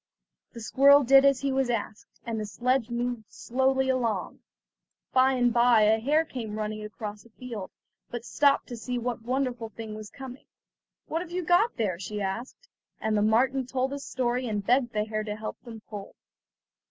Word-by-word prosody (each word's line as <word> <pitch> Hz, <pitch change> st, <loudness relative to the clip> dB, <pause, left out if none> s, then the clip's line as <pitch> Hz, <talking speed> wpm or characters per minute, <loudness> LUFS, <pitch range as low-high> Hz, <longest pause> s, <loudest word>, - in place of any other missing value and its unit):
The 235 Hz, -, -8 dB
squirrel 280 Hz, +5 st, +6 dB
did 270 Hz, +2 st, +7 dB
as 275 Hz, -2 st, +4 dB
he 275 Hz, -1 st, 0 dB
was 265 Hz, -1 st, +1 dB
asked, 220 Hz, -2 st, -3 dB, 0.2 s
and 230 Hz, -2 st, -3 dB
the 215 Hz, -, -3 dB
sledge 245 Hz, +4 st, 0 dB
moved 240 Hz, -2 st, -3 dB
slowly 265 Hz, +9 st, +1 dB
along. 235 Hz, -7 st, -1 dB, 0.7 s
By 260 Hz, +1 st, +5 dB
and 245 Hz, -2 st, +2 dB
by 235 Hz, -2 st, +5 dB
a 220 Hz, +1 st, +4 dB
hare 300 Hz, +7 st, +2 dB
came 225 Hz, -7 st, -6 dB
running 215 Hz, 0 st, -3 dB
across 210 Hz, -1 st, -7 dB
a 235 Hz, -, -19 dB
field, 225 Hz, -4 st, -7 dB, 0.4 s
but 240 Hz, -1 st, -6 dB
stopped 280 Hz, +1 st, +3 dB
to 245 Hz, -, -5 dB
see 245 Hz, +2 st, -4 dB
what 240 Hz, 0 st, -3 dB
wonderful 245 Hz, -1 st, -2 dB
thing 220 Hz, -1 st, -8 dB
was 215 Hz, -1 st, -8 dB
coming. 265 Hz, -1 st, -10 dB, 0.6 s
"What 325 Hz, +2 st, -2 dB
have 355 Hz, -, -7 dB
you 355 Hz, 0 st, -3 dB
got 365 Hz, +8 st, +3 dB
there?" 195 Hz, -7 st, -1 dB
she 210 Hz, +2 st, -5 dB
asked, 230 Hz, -, -5 dB, 0.3 s
and 220 Hz, 0 st, 0 dB
the 210 Hz, -, +2 dB
marten 250 Hz, +5 st, +2 dB
told 260 Hz, +1 st, -1 dB
his 280 Hz, 0 st, -5 dB
story 250 Hz, 0 st, -1 dB
and 205 Hz, -3 st, -2 dB
begged 245 Hz, +1 st, +3 dB
the 210 Hz, -1 st, 0 dB
hare 215 Hz, 0 st, -2 dB
to 210 Hz, -1 st, -4 dB
help 215 Hz, 0 st, -7 dB
them 230 Hz, -3 st, -10 dB
pull. 205 Hz, -2 st, -8 dB
240 Hz, 190 wpm, -27 LUFS, 215-265 Hz, 0.7 s, did